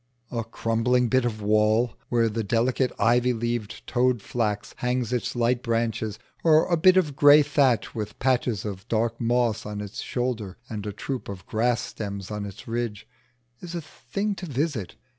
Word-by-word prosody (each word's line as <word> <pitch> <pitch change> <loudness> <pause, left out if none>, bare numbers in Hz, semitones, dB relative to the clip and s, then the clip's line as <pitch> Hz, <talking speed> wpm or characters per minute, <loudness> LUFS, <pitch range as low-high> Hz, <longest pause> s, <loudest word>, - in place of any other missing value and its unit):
A 115 -2 -2
crumbling 115 +2 +1
bit 130 0 +3
of 110 -3 -3
wall 110 +3 +3 0.2
where 115 -1 +3
the 115 +1 -2
delicate 120 +4 +1
ivy 120 +3 +3
leaved 120 -2 -3
toad 125 -1 +2
flax 105 -1 -2
hangs 125 -1 -1
its 125 0 -1
light 120 +1 +1
branches, 115 -2 -1 0.3
or 160 -1 +5
a 175 - +2
bit 185 +3 +5
of 155 -7 +2
grey 145 +1 +7
thatch 140 -4 +2
with 105 -2 -5
patches 125 -5 +1
of 100 0 -6
dark 115 0 0
moss 115 -2 +1
on 105 0 -5
its 105 -1 -6
shoulder 120 -6 -3
and 105 -3 -5
a - - -2
troop 130 +5 -5
of 95 -2 -7
grass 120 +2 +1
stems 100 -3 -6
on 105 -1 -3
its 100 +2 -11
ridge, 115 -3 -3 0.5
is 175 -1 -7
a 170 - -2
thing 200 +6 -4
to 190 -2 -7
visit. 140 - -2
120 Hz, 175 wpm, -25 LUFS, 110-125 Hz, 0.5 s, grey